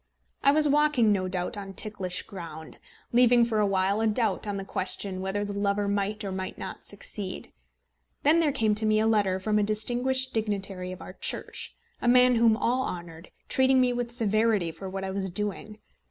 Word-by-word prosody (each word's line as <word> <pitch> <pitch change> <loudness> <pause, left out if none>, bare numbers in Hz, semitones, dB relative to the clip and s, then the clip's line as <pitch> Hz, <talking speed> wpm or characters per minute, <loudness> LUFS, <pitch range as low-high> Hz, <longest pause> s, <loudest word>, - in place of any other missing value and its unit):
I 275 - +4
was 300 +1 +6
walking 290 -6 +3
no 190 -2 0
doubt 185 +4 -3
on 195 -1 -8
ticklish 190 -4 0
ground, 160 -4 -9 0.3
leaving 240 -1 +5
for 225 -2 -1
a 210 - +3
while 195 +2 +1
a 225 - +2
doubt 215 -2 0
on 205 -1 -2
the 195 - -5
question 185 0 -4
whether 195 +2 -2
the 205 - -5
lover 200 0 0
might 200 +1 -1
or 195 - -4
might 190 0 -5
not 190 - -8
succeed. 200 -1 -6 0.7
Then 310 +4 +5
there 315 -3 +2
came 225 -6 +2
to 215 +1 0
me 215 0 +3
a 220 - +2
letter 205 -4 +2
from 210 +2 +1
a - - +2
distinguished 245 +5 0
dignitary 195 -4 -2
of 185 - -8
our - - -9
Church, - - -4 0.3
a - - -1
man 250 +1 +6
whom 225 -1 +4
all 250 +3 +1
men - - -3
honoured, 170 -1 -12 0.2
treating 260 0 +3
me 250 -1 +3
with 245 -1 -3
severity 215 -5 +1
for 190 +4 -8
what 195 0 -5
I 190 - -3
was 190 0 -2
doing. 210 +3 -5
210 Hz, 200 wpm, -27 LUFS, 190-235 Hz, 0.7 s, was